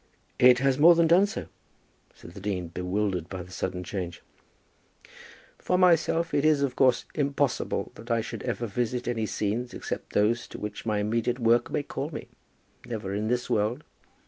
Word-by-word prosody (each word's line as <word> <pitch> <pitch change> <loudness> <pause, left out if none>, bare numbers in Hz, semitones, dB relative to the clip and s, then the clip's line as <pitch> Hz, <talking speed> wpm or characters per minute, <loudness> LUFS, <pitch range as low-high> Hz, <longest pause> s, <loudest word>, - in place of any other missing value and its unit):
"It 125 0 +7
has 135 +1 +1
more 170 +3 +8
than 170 0 +4
done 175 +5 +5
so," - - -5 0.7
said - - -13
the 95 - -10
dean, 95 -3 -3
bewildered 90 0 -2
by 95 -2 -5
the 90 - -15
sudden 90 -1 -3
change. 90 -2 -5 1.4
"For 180 - 0
myself, 170 -2 +3
it 145 - +2
is, 155 -2 +4
of 130 -2 -1
course, 130 -2 +3
impossible 140 -2 -1
that 115 +2 -13
I 115 -1 +2
should - - -6
ever 120 -1 -2
visit 120 +3 -2
any 115 -3 -1
scenes 110 +5 -2
except - - -6
those 115 +3 +2
to - - -9
which 105 +2 -6
my 105 -1 +1
immediate 115 +4 0
work 120 -1 +3
may - - -1
call - - -4
me, - - -8 0.5
never 105 -5 -5
in 105 +2 -1
this 125 +1 0
world. 110 +7 0
115 Hz, 175 wpm, -27 LUFS, 105-135 Hz, 1.4 s, more